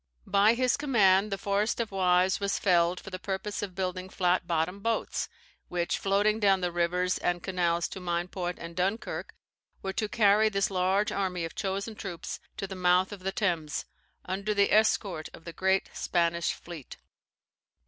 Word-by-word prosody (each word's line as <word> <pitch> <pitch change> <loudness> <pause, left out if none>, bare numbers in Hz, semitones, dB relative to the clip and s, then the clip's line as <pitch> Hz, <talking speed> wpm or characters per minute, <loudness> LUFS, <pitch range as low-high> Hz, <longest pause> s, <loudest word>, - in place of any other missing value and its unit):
By 205 +3 +4
his 255 0 +2
command, 210 -8 +3
the 195 - -1
forest 200 +4 0
of 230 -3 -2
Waes 185 -1 +3
was 200 -1 0
felled 175 -1 +3
for 195 - -10
the 185 - -5
purpose 200 +2 -3
of 195 -3 -5
building 185 -1 -3
flat 180 -1 +1
bottomed 175 +3 -1
boats, 230 +1 -1 0.4
which, 175 -1 -1
floating 205 +2 +2
down 195 -3 +3
the 180 -1 0
rivers 180 +1 0
and 175 -1 -1
canals 175 -2 0
to - - -7
Meinport 175 0 -2
and 170 0 -8
Dunkerque, 190 +5 -2 0.5
were 190 - -2
to 215 +1 -2
carry 215 0 +4
this 195 -1 0
large 190 +3 +1
army 180 -3 -1
of 165 - -7
chosen 200 +3 -3
troops 190 -5 -6 0.2
to - - -3
the 195 - -7
mouth 180 +1 +3
of 205 - -7
the 190 +1 -2
Thames, 170 -7 -1 0.4
under 200 +3 -2
the 200 0 +3
escort 200 -6 +2
of 165 - -16
the 170 - -7
great 190 +2 +1
Spanish 170 -1 0
fleet. 170 -6 -10
190 Hz, 170 wpm, -29 LUFS, 175-200 Hz, 0.5 s, By